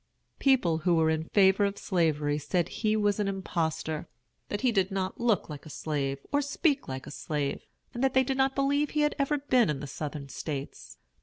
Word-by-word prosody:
People 215 - +3
who 175 +1 +2
were 160 -1 +3
in 160 0 -1
favor 195 +2 +4
of 200 0 0
Slavery 150 -5 +1
said 170 +4 0
he 215 -1 0
was 205 -1 +1
an 205 - +1
impostor; 160 -5 -2 0.4
that 205 - -3
he 255 - +3
did 195 -4 +2
not 190 -1 -3
look 230 -6 +2
like 150 -2 -8
a - - -11
slave, 140 -2 -2
or 285 0 +3
speak 285 0 0
like 130 0 -5
a - - -8
slave; 145 -1 -3 0.3
and 240 - -3
that 265 -1 +2
they 260 - +6
did 265 +1 -1
not 270 0 +2
believe 285 +1 +2
he 300 - 0
had 295 0 +2
ever 280 +2 +1
been 255 - +3
in 145 -3 -1
the 145 - -5
Southern 145 0 -5
States. 140 0 -6
190 Hz, 210 wpm, -29 LUFS, -, 0.4 s, they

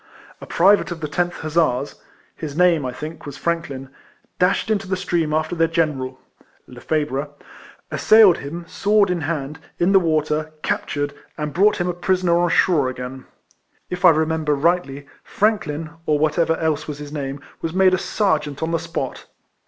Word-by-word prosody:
A - - -9
private 195 +3 +4
of 175 -2 -5
the 155 - -3
10th 175 +3 -1
Hussars 155 -4 0 0.2
— - - -34
his 150 -1 -5
name, 170 -6 +3
I - - -3
think, 155 +4 -8
was 145 - -7
Franklin 160 -6 -3 0.2
— - - -40
dashed 180 +3 +2
into 200 -3 0
the 185 0 -1
stream 175 -4 -1
after 155 +2 0
their 165 -1 +3
General 145 -6 -1 0.5
(Lefebvre), 145 +2 -2 0.6
assailed 215 -5 +6
him, 170 +5 -7
sword 205 0 +2
in 175 -2 -1
hand, 150 -1 -3 0.2
in 175 +3 +2
the 195 - +6
water, 155 -2 0
captured, 145 -1 -2 0.2
and 150 -1 -3
brought 205 +4 +4
him 175 - 0
a 180 - 0
prisoner 175 -1 +1
on 175 0 +2
shore 165 -6 +3
again. 130 +1 -7 0.7
If 180 0 -4
I 180 - +9
remember 160 -1 +1
rightly, 145 -2 0 0.2
Frank 215 -3 +1
lin, 155 +1 -5 0.2
or 150 - +3
whatever 160 +2 +1
else 155 -2 -1
was 150 -2 -5
his 145 0 -9
name, 140 -1 -4 0.2
was 165 - -2
made 185 +1 +4
a 185 - +2
Serjeant 155 -10 -1
on 160 - -1
the 165 - +1
spot. - - -5
160 Hz, 175 wpm, -21 LUFS, 145-175 Hz, 0.7 s, I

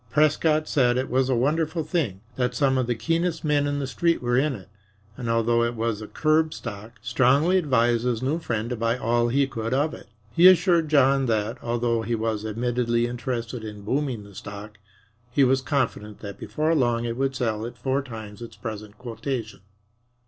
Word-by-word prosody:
Prescott 155 +2 +2
said 125 -3 +2
it 130 -1 -2
was 130 +1 +2
a 130 - +2
wonderful 160 +6 0
thing 145 - -2
that 125 0 -1
some 135 0 +2
of 130 -2 0
the 120 - 0
keenest 165 +8 -1
men 145 -1 +2
in 145 0 -1
the 140 - -2
Street 170 +6 +1
were 120 0 0
in 135 +2 +2
it, 95 - -11 0.5
and, 120 -3 -5
although 115 +1 +2
it 120 0 0
was 115 -1 -2
a 110 - -7
curb 155 0 +1
stock, 105 +3 -8
strongly 135 +7 +3
advised 120 -7 +2
his 125 -1 -1
new 145 +6 0
friend 115 -6 -3
to - - 0
buy 115 +1 0
all 120 0 +1
he 140 +4 +2
could 115 -2 -3
of 150 +3 +1
it. - - -11 0.2
He 170 +9 +7
assured 175 -3 +5
John 135 -2 +4
that, 110 +2 -1
although 120 -1 0
he 115 +1 -1
was 110 -1 -2
admittedly 120 +1 0
interested 120 -1 -4
in 105 -2 -8
booming 130 -2 -1
the 100 0 -14
stock, 100 +2 -9 0.5
he 135 +3 +3
was 130 0 +3
confident 120 -7 -2
that 100 -2 -8
before 155 +1 0
long 120 -5 +1
it 115 0 -2
would 135 +1 -1
sell 110 -4 -1
at 120 - -10
four 135 +1 0
times 110 -5 -9
its 115 - -9
present 105 -2 -7
quotation. 120 -1 -5
125 Hz, 195 wpm, -25 LUFS, 115-140 Hz, 0.5 s, He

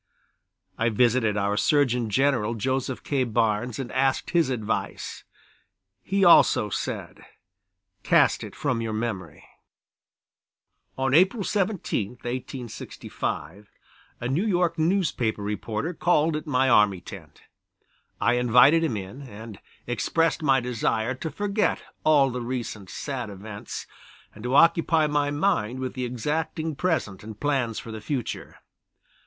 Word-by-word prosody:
I 115 +1 +2
visited 115 -1 +2
our 100 0 0
Surgeon 125 -2 +2
General, 120 -2 +1
Joseph 130 +3 -2
K. 140 -3 0
Barnes, 115 -1 0
and 130 -3 -5
asked 135 +1 0
his 170 -5 +3
advice; 110 -4 -3 0.8
he 195 0 +1
also 140 -10 +6
said: - - -4 0.8
"Cast - - +3
it - - -9
from 115 -2 -1
your 115 -1 -3
memory." 110 -8 -4 1.5
On 130 0 0
April 190 - +4
17, 190 - -1
1865, 120 -4 -6 0.5
a 120 - -3
New 140 +9 0
York 175 -5 +1
newspaper 155 - 0
reporter 105 - -3
called 160 -2 +2
at 155 +1 -5
my 130 -2 +2
army 105 -6 +4
tent. 85 -4 -12 0.8
I 120 - +2
invited 125 +7 +5
him 140 -10 0
in, 100 +8 -7
and 110 -4 -10 0.3
expressed 165 +8 0
my 135 -3 +4
desire 120 -1 -1
to 145 +5 -5
forget 205 +4 -1 0.2
all 145 -4 +4
the 125 0 -4
recent 120 -5 -5
sad 130 -6 -4
events, 100 +1 -7 0.5
and 105 - -12
to 125 +2 0
occupy 165 0 +4
my 145 -1 +1
mind 145 - 0
with 130 -1 -3
the 130 -1 -3
exacting 150 +5 -2
present 145 - -1
and 110 -1 -9
plans 135 -6 0
for 115 - -6
the 110 -1 -7
future. 130 0 -4
125 Hz, 130 wpm, -25 LUFS, 110-150 Hz, 1.5 s, also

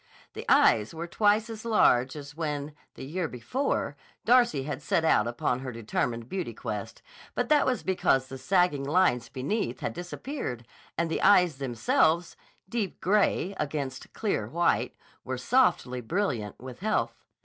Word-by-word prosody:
The - - -7
eyes 110 +8 +4
were 165 +1 -4
twice 210 +4 +2
as 225 -2 -8
large 130 - +3
as 145 -1 -8
when, 150 -2 -3 0.2
the - - -8
year 165 +4 -2
before, 145 - -2 0.3
Darcy 240 - +4
had 145 0 -4
set 160 +3 +1
out 115 -8 +4
upon 120 +1 -1
her 130 -1 -5
determined 115 +1 -2
beauty 185 +5 -4
quest; - - -6 0.3
but - - -1
that 300 -2 +4
was 250 -4 0
because 135 -8 +2
the 135 0 -8
sagging 180 -2 +2
lines 140 -6 +2
beneath 135 - -2
had - - -2
disappeared 175 - -5 0.3
and 165 0 0
the - - -1
eyes 180 -7 +5
themselves, 140 +7 +1 0.3
deep 215 -3 -3
gray 200 -1 +2
against 140 -3 -4
clear 215 -3 -2
white, 170 +1 +1 0.3
were 130 0 -4
softly 125 - +2
brilliant 120 - -2
with 125 0 -9
health. 215 +3 -1
155 Hz, 150 wpm, -28 LUFS, 130-195 Hz, 0.3 s, eyes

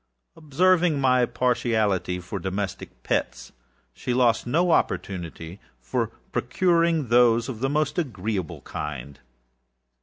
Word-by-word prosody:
Observing 165 +1 +2
my 125 -2 +3
partiality 110 -7 0
for 95 +3 -6
domestic 95 +1 -5
pets, - - -2 0.4
she 125 - -3
lost 120 -2 +2
no 170 +7 +2
opportunity 85 - -2 0.3
of - - +1 0.2
procuring 170 -6 +1
those 120 -1 +4
of 120 -4 -6
the 135 +2 0
most 150 +3 0
agreeable 105 - -3
kind. 70 -2 -6
120 Hz, 110 wpm, -25 LUFS, 95-150 Hz, 0.4 s, those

